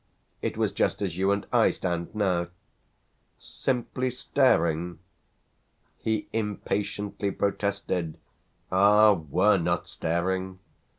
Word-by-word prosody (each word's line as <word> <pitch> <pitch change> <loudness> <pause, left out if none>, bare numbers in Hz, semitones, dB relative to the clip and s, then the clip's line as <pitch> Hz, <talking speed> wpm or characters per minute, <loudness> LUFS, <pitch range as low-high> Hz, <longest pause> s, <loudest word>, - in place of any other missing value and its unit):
It - - -3
was - - +1
just - - 0
as 90 -5 -2
you 95 +2 +2
and 100 0 0
I - - +5
stand 85 +2 -3
now." 90 -4 +1 0.9
"Simply 130 0 -2
staring?" 85 - +1 1.0
He 110 -2 -1
impatiently 105 -1 -2
protested. 100 -5 -2 0.5
"Ah! 105 +3 +6
we're 90 +5 +2
not 85 +1 -1
staring!" 95 +3 -2
100 Hz, 100 wpm, -27 LUFS, 85-105 Hz, 1.0 s, Ah